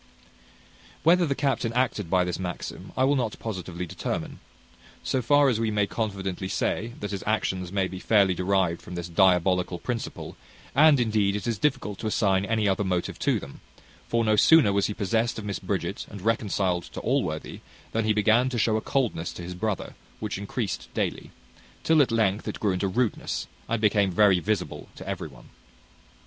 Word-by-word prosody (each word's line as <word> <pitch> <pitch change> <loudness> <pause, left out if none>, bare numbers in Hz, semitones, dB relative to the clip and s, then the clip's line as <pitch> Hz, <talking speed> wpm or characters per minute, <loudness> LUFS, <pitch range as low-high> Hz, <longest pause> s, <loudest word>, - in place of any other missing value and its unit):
Whether 175 +1 +5
the 140 - 0
captain 135 -5 0
acted 120 -7 0
by 90 0 +3
this 90 0 -3
maxim, 90 0 -6
I 130 - +3
will 140 +2 +3
not 120 -5 -1
positively 90 -5 -5
determine: 80 - -4 0.6
so 130 - 0
far 145 +4 +4
we 115 -4 +2
may 105 -1 +1
confidently 95 -3 -3
say, 110 +4 -1
that 105 -1 -4
his 100 -2 -4
actions 95 -4 -1
may 95 -1 +1
be 95 0 -7
fairly 100 -2 +3
derived 90 -1 0
from 90 - -9
this 85 -1 -4
diabolical 90 0 +3
principle; 120 +6 -5 0.4
and 150 0 +6
indeed 105 -4 +1
it 105 - -4
is 115 -3 -1
difficult 130 -9 -1
to 110 - -3
assign 100 -3 +2
any 110 -1 +1
other 95 +1 +1
motive 90 -2 -2
to - - +1
them: 70 - -11 0.5
for 115 0 +1
no 110 0 +3
sooner 140 -2 +6
was 100 0 +2
he 105 - -4
possessed 110 +4 0
of 110 - -6
Miss 100 -1 -3
Bridget, - - -3
and 100 -3 -9
reconciled 100 -5 0
to - - -8
Allworthy, - - -1 0.3
than 115 -1 0
he 110 - +3
began 110 +4 +3
to 125 - -3
show 110 -1 +2
a - - -2
coldness 120 -12 -1
to 85 - -8
his 90 +1 -6
brother 105 +2 -3 0.3
which 105 -3 -4
increased 100 +1 -4
daily; - - -2 0.5
till 160 -2 +5
at 135 - +3
length 110 -3 +1
it - - -4
grew 105 - +1
into 95 +2 0
rudeness, 115 +3 -1 0.2
and 115 0 0
became 105 -2 +3
very 95 0 +4
visible 90 -6 -3
to - - -10
every - - -3
one. 65 -5 -16
105 Hz, 185 wpm, -26 LUFS, 95-115 Hz, 0.6 s, and